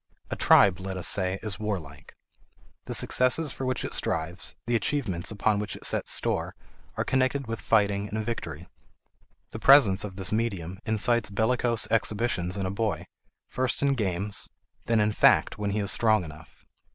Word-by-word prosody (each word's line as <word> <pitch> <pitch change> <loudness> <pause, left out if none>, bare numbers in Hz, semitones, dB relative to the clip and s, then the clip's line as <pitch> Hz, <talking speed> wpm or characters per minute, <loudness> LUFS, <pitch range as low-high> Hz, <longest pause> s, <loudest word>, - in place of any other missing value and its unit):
A - - -1
tribe, 95 -2 +5
let 95 0 -5
us 90 - -1
say, 95 -1 0
is 105 -2 -5
warlike. 95 -10 -6 0.7
The - - -3
successes 130 +4 +2
for 130 - -5
which 130 -2 -1
it - - -4
strives, 85 +3 -1
the 120 +1 0
achievements 115 - -1
upon 105 0 0
which 105 0 -4
it - - -7
sets - - 0
store, - - 0 0.4
are - - 0
connected 130 +1 0
with 115 0 -5
fighting 100 -2 +1
and 110 +1 -3
victory. 85 -8 -5 0.8
The 110 - -7
presence 115 -8 +6
of 100 -3 -7
this 95 -1 -4
medium 100 -5 -2
incites 110 +1 +1
bellicose 115 +2 0
exhibitions 105 -5 0
in 95 - -2
a 95 - -2
boy, 100 -4 -2 0.4
first 130 +1 -2
in 140 -1 +3
games, 100 -3 -2 0.4
then 115 -1 +2
in 105 0 +2
fact 105 - +3
when 105 -1 -2
he 100 - -2
is 100 -2 +1
strong 110 -4 +2
enough. 80 0 -13
105 Hz, 170 wpm, -26 LUFS, 95-115 Hz, 0.8 s, presence